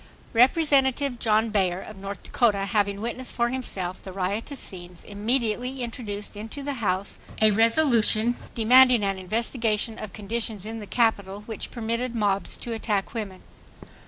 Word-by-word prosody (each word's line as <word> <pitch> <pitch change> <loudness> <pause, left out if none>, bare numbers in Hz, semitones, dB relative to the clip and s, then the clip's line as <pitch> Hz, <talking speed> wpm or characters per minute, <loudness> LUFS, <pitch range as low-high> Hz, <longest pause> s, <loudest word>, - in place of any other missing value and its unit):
Representative 270 0 +3
John 220 0 +2
Baer 185 -4 +1
of 215 - -10
North 195 0 -7
Dakota, 205 -5 +1
having 200 -1 0
witnessed 240 +3 -3
for 235 0 +1
himself 190 -8 -3
the 190 - -9
riotous 200 +9 -3
scenes, 175 -2 -5
immediately 240 +4 -1
introduced 215 -4 -6
into 220 +7 -7
the 285 0 -2
House 195 -1 -1 0.2
a 215 -1 +6
resolution 230 0 +4 0.2
demanding 250 0 +6
an 195 -1 -1
investigation 225 +2 -1
of 210 - -7
conditions 215 0 -4
in 225 +1 -5
the 210 - -9
Capital 205 -4 0
which 220 0 -6
permitted 235 +1 -3
mobs 200 -3 0
to 235 - -5
attack 210 -3 -2
women. 205 -5 -6
220 Hz, 145 wpm, -25 LUFS, 200-240 Hz, 0.2 s, a